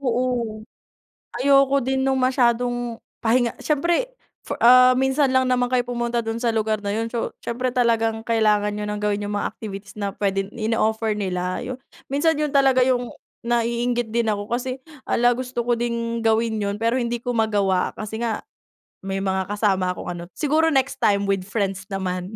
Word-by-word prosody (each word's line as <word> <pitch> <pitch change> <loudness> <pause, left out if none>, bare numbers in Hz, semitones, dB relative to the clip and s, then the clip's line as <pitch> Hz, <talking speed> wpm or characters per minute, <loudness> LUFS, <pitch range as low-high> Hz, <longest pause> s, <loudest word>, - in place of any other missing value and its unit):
Oo. 245 -4 -1 0.8
Ayoko 275 0 +4
din 265 +1 0
nung 265 -1 +1
masyadong 245 -2 +1 0.2
pahinga 235 +1 +2
siyempre 340 - 0 0.3
for - - -4
ah, 255 +1 +8
minsan 265 +2 +2
lang 260 0 +3
naman 250 -1 +2
kayo 250 -1 +2
pumunta 240 -1 -1
do'n 225 +1 -3
sa 235 -1 +1
lugar 215 -1 0
na 205 - -5
yun, 225 +1 -1
so 235 - -2
siyempre 250 +2 -2
talagang 225 -2 +1
kailangan 215 -3 +2
nyo 210 0 -4
ng 210 0 -3
gawin 210 0 0
yung 205 0 -3
mga 205 - -1
activities 200 -2 -8
na 200 -1 -3
puwedeng 195 -1 -1
ino-offer 220 0 0
nila 185 -2 -2
yun. 255 +1 -5 0.3
Minsan 290 +3 +1
yun 300 - +1
talaga 270 -2 +4
yung 250 -2 0 0.3
naiinggit 235 0 0
din 235 -1 +1
ako 205 -1 -2
hala 240 - +2
kasi 255 +1 -4 0.7
gusto 250 -1 -4
ko 240 - +1
din 235 0 -2
gawin 225 0 +2
yun 200 -1 -1
pero 230 +3 +1
hindi 240 -1 -2
ko 245 - -2
magawa 200 -4 +1
kasi 215 +1 -6
nga 230 -1 -2 0.6
may 195 0 -3
mga 190 -1 -1
kasama 195 -3 +1
akong - - -6
ano, 175 -1 -6
siguro 310 +1 +2
next 270 -3 0
time 200 -3 +3
with 195 -2 -1
friends 200 -2 -2
naman. 190 0 -3
230 Hz, 175 wpm, -23 LUFS, 210-250 Hz, 0.8 s, ah